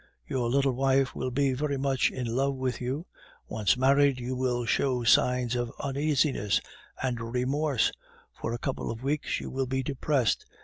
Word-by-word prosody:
Your 120 - -1
little 135 +2 +3
wife 135 +1 +2
will 130 - -2
be 135 +1 +1
very 140 +1 -1
much 135 -1 +2
in 125 - -4
love 135 +4 0
with 130 -1 -2
you. 135 +7 -3 0.4
Once 110 +3 +1
married, 140 0 +4
you 125 +1 -3
will 125 -1 0
show 125 0 +1
signs 125 +1 +3
of 120 -1 -2
uneasiness 140 -6 +1 0.4
and 125 -3 -1
remorse; 135 +2 +1 0.4
for - - -4
a 120 - -2
couple 130 +2 -3
of 115 +2 -5
weeks 145 +2 -1
you - - -6
will 135 0 -1
be 130 +1 -1
depressed. 135 -2 0
130 Hz, 170 wpm, -28 LUFS, 125-140 Hz, 0.4 s, married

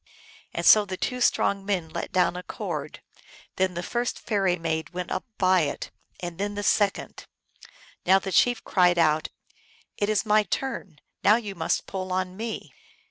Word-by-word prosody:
And - - -3
so 215 - +8
the 190 -2 -5
two 250 +5 -2
strong 200 -4 +2
men 190 -5 -1
let - - -5
down 180 -1 +2
a 180 - -4
cord: - - -6 0.5
then 185 -1 +1
the 175 - -3
first 240 +5 -2
fairy 195 -5 +1
maid 160 -1 -2
went 180 -1 -4
up - - -2
by 185 -1 +4
it, 155 - -2 0.3
and 175 0 -6
then 205 +1 -2
the 205 - -3
second. 200 0 0 0.8
Now 190 +2 +5
the 195 0 -4
chief 245 +7 +3
cried 180 -2 +3
out, 155 -2 +3 0.4
" - - -32
It 205 - +1
is 215 +1 +1
my 215 0 +5
turn; 210 - -4 0.3
now 210 - +7
you 215 -4 -3
must 165 -3 -1
pull 185 -1 -5
on 185 0 -1
me 225 +2 -5
190 Hz, 180 wpm, -26 LUFS, 180-205 Hz, 0.8 s, so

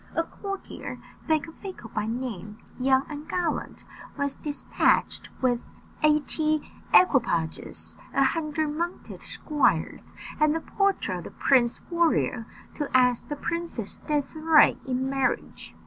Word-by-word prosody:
A 330 - +2
courtier, 395 +3 -7 0.3
Becafico 315 - -3
by 210 -2 -1
name, 220 -4 -4 0.2
young 265 +1 +3
and 300 -1 -8
gallant, 350 -3 -2 0.3
was 280 -1 0
despatched 295 -1 0
with 245 -2 +3 0.4
eighty 305 0 +2 0.2
equipages, 225 - +2
a 275 - +3
hundred 305 +1 0
mounted 340 +4 -4
squires, 300 -2 0 0.3
and 305 0 +4
the - - 0
portrait 395 +4 0
of - - -8
the - - -6
Prince 245 -3 +2
Warrior, 325 -9 +1 0.3
to 295 -2 -3
ask 250 -2 +3
the 295 - -2
Princess 335 -9 -4
Désirée 310 +1 +4
in 260 0 0
marriage. 270 -2 -2
295 Hz, 115 wpm, -26 LUFS, 255-320 Hz, 0.4 s, and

